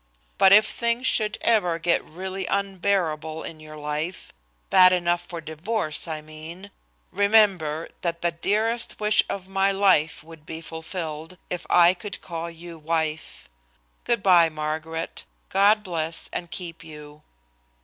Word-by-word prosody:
But 190 - +7
if 210 +2 +8
things 235 +2 0
should 215 -4 +3
ever 180 -8 +2
get 170 +1 +1
really 190 +3 -5
unbearable 180 -5 -1
in 160 - -8
your 155 0 -11
life, 150 +4 -4 0.4
bad 185 0 +8
enough 175 -1 +1
for 175 -1 -8
divorce, 160 +2 -3
I 155 -2 -4
mean, 160 +6 -10 0.4
remember 195 -7 +3
that 170 -1 -3
the 170 - +2
dearest 215 +7 -1
wish 210 0 +4
of 190 -1 -5
my 195 +1 +1
life 190 -7 +2
would 160 -1 -14
be 160 +1 -7
fulfilled 160 0 -6
if 180 - -4
I 175 0 +6
could 200 +1 -8
call 170 -1 -5
you 170 0 -11
wife. 160 0 -3 0.6
Good 235 -4 0
by, 175 -4 +6
Margaret. 155 +1 -4 0.3
God 205 +2 +4
bless 165 -3 -4
and 175 - -4
keep 165 -1 -7
you." 150 -1 -12
170 Hz, 140 wpm, -24 LUFS, 160-195 Hz, 0.6 s, if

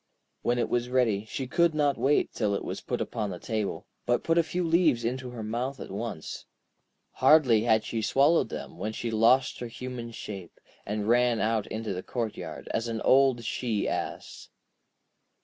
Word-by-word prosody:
When 120 - +1
it 120 - +1
was 120 0 -1
ready, 115 -5 +2
she 130 +4 -4
could 170 +4 +2
not 145 -2 +2
wait 145 +2 +2
till 105 -3 0
it - - -4
was - - -4
put - - -3
upon 105 -3 -2
the 90 - -5
table, 110 +1 -3 0.2
but 120 0 +2
put 165 +1 +3
a - - +7
few 175 +2 -2
leaves 160 -8 +3
into 125 +2 -2
her 120 -3 -7
mouth 125 +5 -3
at - - -8
once. 100 -5 -5 0.6
Hardly 130 -5 +5
had 110 -2 +3
she 115 - -3
swallowed 140 +9 +3
them, - - -7
when 105 +3 -3
she 115 +1 -3
lost 115 +4 +3
her 120 - -4
human 125 0 -6
shape, 100 -6 -8 0.3
and 105 0 -2
ran 120 0 +3
out 110 -1 0
into 110 -2 -4
the 90 - -4
courtyard, 115 +1 -5
as 115 +1 -1
an 115 -1 -3
old 130 -2 +4
she 110 -1 -1
ass. - - -5
120 Hz, 185 wpm, -28 LUFS, 110-130 Hz, 0.6 s, a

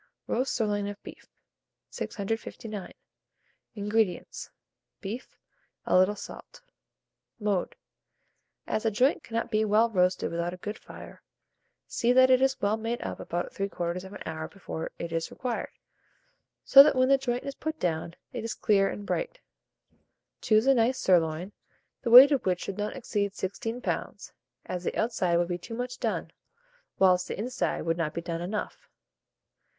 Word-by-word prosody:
ROAST 255 +2 -1
SIRLOIN 205 -3 0
OF 205 0 -8
BEEF. - - -12 0.6
659. 215 -1 -5 0.8
INGREDIENTS. 210 -2 -1 0.5
Beef, 220 +5 -7 0.5
a - - +2
little 185 +3 +4
salt. - - -11 0.8
Mode. 205 -4 -1 0.9
As 215 - -2
a 225 - +3
joint 255 +9 +2
cannot 230 0 -3
be 215 -1 +2
well 220 +2 +3
roasted 180 -2 +1
without 170 +1 -2
a - - -15
good 210 +4 -6
fire, - - -12 0.6
see 240 - +1
that 260 0 +6
it 255 0 +5
is 270 0 +2
well 210 +2 +1
made 230 +2 -3
up - - -5
about 175 +1 -4
3/4 190 0 -4
hour 160 0 -4
before 165 -3 -6
it 170 - -5
is 165 0 -2
required, 250 -2 -4 1.0
so 275 - +10
that 285 0 +5
when 255 0 +3
the 275 0 +5
joint 245 -2 -2
is 275 - -5
put 315 +2 -5
down, 165 0 -2 0.2
it 240 -3 -4
is 230 - -3
clear 195 -2 +3
and 205 - -6
bright. - - -3 1.0
Choose 215 +1 +3
a 270 - +6
nice 245 +1 +2
sirloin, 175 -2 +2 0.5
the 235 - -2
weight 255 +5 +11
of 275 -4 +2
which 180 -1 +1
should 195 +1 -5
not 210 +4 -2
exceed 205 -6 -2
16 225 +5 -4
lbs., - - -4 0.3
as 180 -1 -4
the - - -2
outside 185 -7 +1
would 175 0 +1
be 175 0 -3
too 230 +6 -8
much 250 +1 -5
done, - - -2 0.7
whilst 185 -1 +4
the - - -5
inside 250 +5 -2
would 165 0 0
not 160 -3 -2
be 170 - -2
done 170 0 -4
enough. 200 +5 -5
210 Hz, 155 wpm, -28 LUFS, 180-240 Hz, 1.0 s, weight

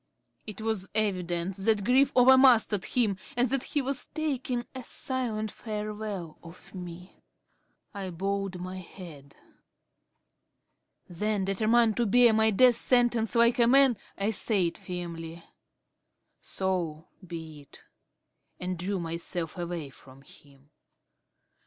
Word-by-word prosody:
It 215 0 -7
was 220 -4 -2
evident 185 -3 -1
that 205 +1 +1
grief 265 +5 +4
over 255 +1 +7
mastered 235 -7 +4
him 220 -6 +1 0.2
and 245 0 +2
that 275 -1 +1
he 290 +1 -2
was 275 +1 -2
taking 265 -6 -2
a 260 -1 -7
silent 230 -5 -2
farewell 210 -5 -6
of 170 +1 -14
me. 180 -1 -10 0.7
I 195 -2 -5
bowed 195 +1 -3
my 185 +1 -6
head. 165 -6 -12 1.7
Then, 205 +2 -1
determined 220 +3 +2
to 240 -2 +2
bear 240 +2 +5
my 220 0 +4
death 245 +3 +5
sentence 240 -2 +2
like 235 +1 +4
a 235 - +5
man, 270 0 +5 0.2
I 200 +2 0
said 195 -5 +1
firmly, 170 -2 -7 1.0
"So 175 -4 -3 0.2
be 160 -4 -8
it," 140 - -18 0.8
and 180 -1 -4
drew 190 +2 -2
myself 170 0 -4
away 170 -5 -5
from 135 0 -15
him. 140 0 -19
200 Hz, 120 wpm, -28 LUFS, 175-235 Hz, 1.7 s, over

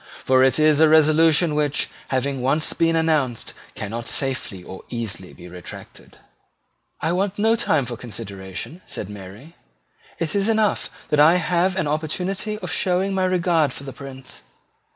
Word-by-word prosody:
For 130 0 +5
it 130 -1 +4
is 155 -1 +4
a 160 -1 +6
resolution 160 +1 +5
which, 150 -1 +1 0.2
having 135 0 -1
once 145 +5 +1
been 165 0 +2
announced, 155 -7 0 0.2
cannot 115 +3 -5
safely 130 -9 -1
or 95 - -9
easily 110 -6 -4
be 90 - -12
retracted." 90 0 -11 0.8
"I 160 - +1
want 190 +2 -1
no 220 +2 +3
time 155 - +1
for 120 0 -5
consideration," 100 - -7
answered 100 - -6
Mary. 105 - -11 0.6
"It 160 -2 -2
is 200 +1 +1
enough 220 -2 +1 0.2
that 150 - +3
I 155 +4 +7
have 180 +1 +1
an 190 - 0
opportunity 180 +7 -2
of 180 - -3
showing 185 +3 +1
my 190 -1 +1
regard 170 -6 +2
for - - -8
the 135 -1 -7
Prince. 130 0 -9
150 Hz, 155 wpm, -22 LUFS, 125-175 Hz, 0.8 s, I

